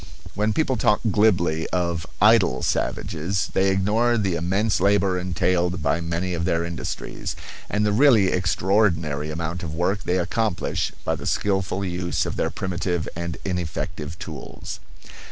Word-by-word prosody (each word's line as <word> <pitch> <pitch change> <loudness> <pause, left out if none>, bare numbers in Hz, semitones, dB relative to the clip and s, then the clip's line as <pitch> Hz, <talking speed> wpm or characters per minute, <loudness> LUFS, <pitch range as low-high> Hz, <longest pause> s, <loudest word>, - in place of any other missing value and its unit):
When 105 +2 +1
people 130 +1 +1
talk 110 -2 +3
glibly 90 -6 +2
of 85 -2 -1
"idle" 110 0 +4
savages 90 +4 -1
they 95 +1 +3
ignore 105 +5 +2
the 95 -4 0
immense 95 +6 +1
labor 100 -2 +3
entailed 90 -1 0
by 75 +3 +1
many 85 +2 -2
of 85 -1 -2
their 85 -1 +1
industries, 85 -2 -5 0.3
and 105 0 +1
the 105 - +2
really 110 -4 +5
extraordinary 85 -4 +1
amount 85 +2 -3
of 80 -2 -5
work 95 +4 0
they 90 - 0
accomplish 90 +1 -1
by - - +1
the - - -5
skilful 95 -1 0
use 90 -1 -1
of - - -3
their - - 0
primitive 90 -2 -2
and 85 0 -4
ineffective 85 -3 -3
tools. - - -7
90 Hz, 145 wpm, -24 LUFS, 85-100 Hz, 0.3 s, really